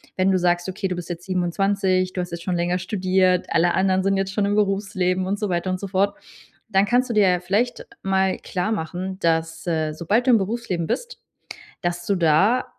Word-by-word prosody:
Wenn 190 +1 +2
du 185 - +3
sagst, 175 0 +1
okay, 190 +1 -3
du 180 - -3
bist 175 -1 -7
jetzt 175 0 -6
27. 185 0 0
Du 180 - -2
hast 175 - -5
jetzt 170 0 -6
schon 180 0 -1
länger 175 +1 0
studiert. 185 -1 +1
Alle 170 +1 +2
anderen 190 0 +2
sind 195 0 +2
jetzt 195 0 -2
schon 205 0 +1
im 200 - 0
Berufsleben 195 -3 0
und 200 +2 -1
so 210 - -2
weiter 175 +1 -1
und 185 - -2
so 200 - -5
fort. 200 +1 +1 0.6
Dann 195 0 +3
kannst 245 +3 +1
du - - -1
dir 205 -3 +5
ja 180 -1 +2
vielleicht 205 +7 -1 0.2
mal 190 0 +1
klarmachen, 185 -1 -3
dass, 165 -1 0
äh, 160 -2 0
sobald 200 - 0
du - - +5
im 230 - +6
Berufsleben 195 -4 -2
bist 485 - -4 0.6
dass 175 0 -2
du 200 - +1
da 185 +9 +3
185 Hz, 210 wpm, -23 LUFS, 175-200 Hz, 0.6 s, im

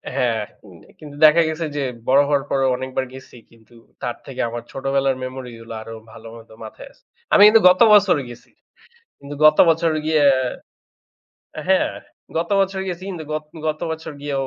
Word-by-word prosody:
হ্যাঁ, 120 -4 0 0.3
উম 95 -4 -15 0.2
কিন্তু 150 -2 -12
দেখা 155 +2 +6
গেছে 160 +1 -4
যে 145 - -2 0.3
বড় 135 +2 +5
হওয়ার 140 -1 +1
পরও 135 -1 +1
অনেকবার 130 +1 -4
গেছি 130 -1 -13 0.2
কিন্তু 115 0 -23 0.3
তার - - -3
থেকে - - -6
আমার 120 +1 -6
ছোটবেলার 135 0 -1
মেমোরিগুলো 125 -3 -8
আরও 115 +1 -9 0.2
ভালো 115 0 -13
মতো 115 -1 -15
মাথায় - - -11
আছে। - - -29 0.3
আমি - - +6
কিন্তু 220 +1 +5
গত 180 +3 +2
বছরও 200 -7 +4
গেছি। 120 -1 -14 0.7
কিন্তু 140 +1 -9
গত 155 0 +6
বছর 165 0 +2
গিয়ে, 155 -1 +1 1.4
আ - - -3
হ্যাঁ, - - +2 0.4
গত 165 +1 -1
বছর 195 0 -1
গেছি 180 0 -6
কিন্তু 170 -4 -7
গত, 155 0 -3 0.2
গত 155 0 -3
বছর 160 0 -6
গিয়েও 140 -2 -3
140 Hz, 170 wpm, -20 LUFS, 130-160 Hz, 1.4 s, দেখা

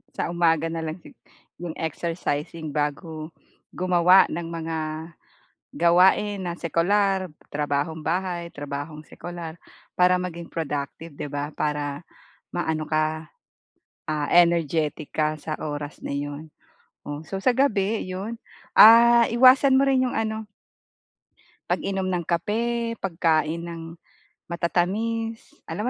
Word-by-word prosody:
Sa - - -2
umaga 165 -2 +2
na 165 0 -3
lang 160 +1 -4
sig - - -15 0.5
yung 170 -2 -5
exercising 160 -1 -3
bago 155 +2 -3 0.5
gumawa 180 +1 +5
ng 170 +1 -4
mga 165 -1 -4 1.0
gawain 185 +5 +4
na 175 -1 -3
sekular, 190 +2 +1 0.2
trabahong 150 +2 -2
bahay, 175 0 -2
trabahong 145 +1 -6
sekular, 175 -2 -8 0.4
para 180 0 +4
maging 170 -2 -5
productive, 150 0 -4
di 145 - -5
ba? 145 +1 -3
Para 145 0 -2 0.5
maano 160 -3 -1
ka, 155 +1 -1 0.8
ah, 150 -1 -1
energetic 165 -3 +2
ka 155 0 0
sa 155 0 -4
oras 145 -1 -5
na - - -4
yun. 145 +2 -5 0.6
O 145 0 -5
so, 195 - -4
sa 255 - +4
gabi 220 -6 +1
yun, 195 +5 -5 0.4
ah, 235 +1 +8
iwasan 255 +3 +6
mo - - +4
rin 260 -1 +3
yung - - -5
ano 220 -1 -2 1.2
pag-inom 190 -1 -1
ng 175 -2 -1
kape, 230 +6 -1
pagkain 165 -3 0
ng 165 -1 -7 0.5
matatamis. 215 +7 -1 0.2
Alam 215 +4 -3
170 Hz, 120 wpm, -24 LUFS, 155-195 Hz, 1.2 s, ah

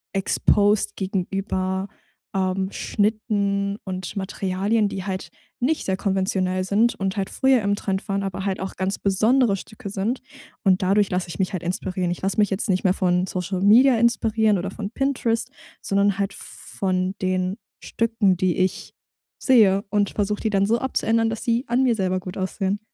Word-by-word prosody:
exposed 205 +1 +2
gegenüber, 190 0 -2 0.5
ähm, 190 0 0
Schnitten 205 -2 0
und 185 0 -5
Materialien, 200 +2 0
die 190 -1 -5
halt 190 -2 -4 0.3
nicht 300 +6 0
sehr 190 - 0
konventionell 190 -1 0
sind 215 +5 +2
und 195 0 -3
halt 195 -1 -1
früher 265 -3 +3
im 200 0 +1
Trend 195 -1 -3
waren, 200 0 0
aber 195 0 -4
halt 195 -1 -1
auch 190 0 -5
ganz 190 +1 -2
besondere 215 +3 +3
Stücke 215 +2 -9
sind. 205 +6 -2 0.4
Und 190 -1 +3
dadurch 200 +2 +3
lasse 180 -1 -2
ich 170 - -7
mich 190 0 0
halt 180 - -3
inspirieren. 180 0 -2
Ich 175 - -5
lasse 195 +2 -1
mich 205 -2 +4
jetzt 195 +2 -2
nicht 185 -1 +1
mehr 185 - +3
von 180 -2 +1
Social 185 0 -3
Media 240 +5 +6
inspirieren 225 -2 +2
oder 185 +2 -3
von 200 +1 -6
Pinterest, 250 -3 -1 0.3
sondern 200 0 +1
halt 200 0 -1
v - - -11
von 185 0 0
den 185 +1 0 0.3
Stücken, 225 -5 +1
die 185 -1 +1
ich 185 +1 -1 0.5
sehe 205 -7 +5
und 205 -1 +1
versuche 210 0 -1
die 220 - 0
dann 195 -1 +2
so 230 +2 +3
abzuändern, 230 -3 +1
dass 225 - -5
sie 235 +1 +1
an 240 +2 +2
mir 245 -3 +3
selber 185 -2 0
gut 185 0 -8
aussehen. 195 +1 -2
195 Hz, 175 wpm, -23 LUFS, 190-215 Hz, 0.5 s, Media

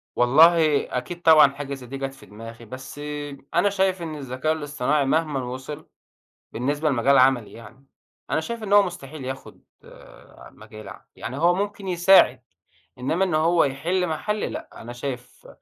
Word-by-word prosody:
والله 155 +4 +5
أكيد 175 +8 -6
طبعًا 155 -4 +7
حاجة 140 0 -6
زي 135 -2 -8
دي 135 - -6
جت 135 0 -4
في 135 - -16
دماغي، 115 +2 -11
بس 130 +5 -10 0.5
أنا 205 - +3
شايف 190 -2 0
إن 160 -2 -5
الذكاء 135 +2 -2
الاصطناعي 145 -2 -1
مهمًا 150 -2 0
وصل 130 +5 -7 0.6
بالنسبة 145 +5 -1
لمجال 135 +1 +3
عملي 130 -4 +3
يعني، 115 +4 -14 0.4
أنا - - +1
شايف 230 +5 -6
إن 205 -1 -1
هو 205 0 +7
مستحيل 155 -6 -7
ياخد 130 +1 -8 0.9
مجالي 110 -2 -12
يعني، 130 - -6
هو 170 +3 +3
ممكن 200 0 -4
يساعد، 175 -7 +5 0.6
إنما 150 +9 0
إن 175 -4 -1
هو 165 +2 +3
يحلّ 165 +7 -1
محلي 210 +7 -2
لأ، - - -7
أنا 120 +1 -8
شايف 125 -1 -7
145 Hz, 155 wpm, -23 LUFS, 130-170 Hz, 0.9 s, طبعًا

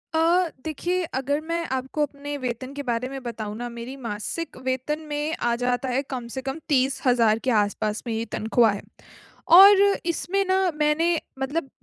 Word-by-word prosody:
अ, 340 +2 +3
देखिए, 350 +4 -1
अगर 285 +3 -1
मैं 335 0 -1
आपको 265 +3 -2
अपने 285 0 -5
वेतन 255 +1 -5
के 285 0 -5
बारे 245 0 -2
में 270 -1 -6
बताऊँ 215 -3 -5
ना, 240 0 -4
मेरी 235 +3 -7
मासिक 230 +10 -4
वेतन 260 +4 -1
में 295 +2 -2
आ 235 0 +1
जाता 245 +1 -1
है, 255 +2 +1
कम 250 -3 -4
से 265 - -3
कम 270 +4 -4
30,000 250 -5 +3
के 255 +2 -1
आसपास 210 0 0
में 230 - -1
ये 225 +1 -2
तनख्वाह 225 0 +3
है। 200 - -5 0.8
और 395 +1 +9 0.2
इसमें 375 +3 0
ना, 375 -1 +3
मैंने 310 +3 +2 0.2
मतलब 270 +1 -2
265 Hz, 175 wpm, -24 LUFS, 240-315 Hz, 0.8 s, और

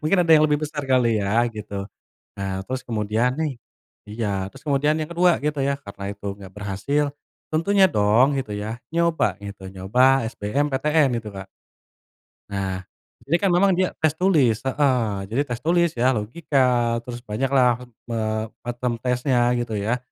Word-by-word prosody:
Mungkin 155 +5 +2
ada 165 - -1
yang 155 0 +6
lebih 150 - +2
besar 145 -1 -5
kali 120 -4 +3
ya 100 - -1 0.2
gitu. 105 -1 -7 0.6
Nah, 95 -1 -3
terus 130 0 -3
kemudian, 110 +2 +1
nih 155 -3 0 0.6
iya. 110 +1 -3 0.2
Terus - - -15
kemudian 145 +1 +2
yang 155 +1 -4
kedua 175 +1 +4
gitu 150 -1 -1
ya 140 - +1
karena 100 -1 -8
itu 100 0 -10
enggak 95 -2 -12
berhasil. 105 +9 -1 0.5
Tentunya 190 +5 +3
dong 105 +2 +4
gitu 110 -6 -4
ya, 110 +3 -5 0.2
nyoba 170 -1 +2 0.2
gitu, 100 -1 -9
nyoba 125 +8 +3
SBMPTN 145 +7 +1
gitu, 110 -2 -7
Kak. 95 0 -7 1.0
Nah, 95 -2 -2 0.5
ini 165 +4 +2
kan 195 - +3
memang 185 +2 +4
dia 185 +1 +1
tes 155 -2 +2
tulis 155 - +2
heeh 135 -1 +2 0.2
jadi 115 +8 -1
tes 120 - -2
tulis 170 +1 +3
ya, 130 +2 +3
logika, 120 0 +1
terus 120 0 -8
banyak 115 +5 -1
lah, 125 -3 +3
eee, 110 -2 -4 0.2
bottom 120 +1 -2
tesnya 125 0 +1
gitu 120 -2 -3
ya. 105 +4 0
125 Hz, 160 wpm, -23 LUFS, 110-150 Hz, 1.0 s, yang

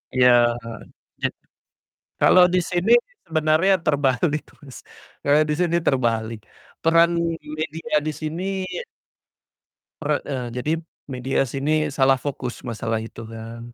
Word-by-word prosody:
Ya, 120 -2 +5 0.7
je - - +2 0.9
kalau 180 - +7
di 180 - +4
sini 180 +5 +1 0.3
sebenarnya 160 +4 +3
terbalik 145 +1 +1 0.2
Mas, 135 -3 -11 0.5
eee, 145 +2 +5
di - - +2
sini 170 -1 +1
terbalik. 115 -3 0 0.4
Peran 165 +1 +5 0.5
media 155 0 -2
di 155 - 0
sini 155 +2 -4 1.6
pera 150 -1 0
eee, 125 -3 -3
jadi 125 +5 -2 0.4
media 130 +1 -1
sini 150 +3 0
salah 135 -2 +2
fokus 130 -4 -5
masalah 115 -2 -3
itu 115 0 -9
kan. 115 +1 -9
140 Hz, 115 wpm, -23 LUFS, 120-155 Hz, 1.6 s, kalau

